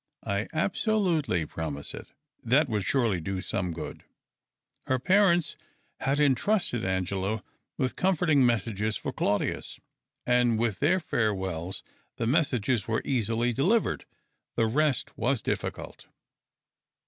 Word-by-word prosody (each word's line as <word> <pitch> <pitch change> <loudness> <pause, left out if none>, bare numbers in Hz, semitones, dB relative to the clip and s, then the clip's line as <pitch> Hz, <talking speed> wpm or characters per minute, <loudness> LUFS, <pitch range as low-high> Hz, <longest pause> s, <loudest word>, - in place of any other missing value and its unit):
I 100 +2 -1
absolutely 170 - +1
promise 75 -2 -4
it." - - -9 0.3
That 140 +6 +3
would 105 -5 -1
surely 115 -7 +1
do 95 +3 -3
some 90 -2 -2
good. 80 - -7 0.8
Her 130 - +2
parents 175 +3 +3 0.4
had 140 +2 0
entrusted 145 - +2
Angela 95 +3 -1 0.3
with 130 -3 -1
comforting 170 -6 +3
messages 110 -3 +1
for - - -5
Claudius 105 0 -1 0.5
and 120 -2 +3
with 115 -3 0
their 175 +6 +3
farewells. 95 - -2 0.3
The 115 - -1
messages 125 - +1
were 110 0 0
easily 120 -2 +1
delivered: 195 - +1 0.5
the 115 - +3
rest 140 +4 0
was 125 0 +1
difficult. - - -4
120 Hz, 115 wpm, -28 LUFS, 100-145 Hz, 0.8 s, That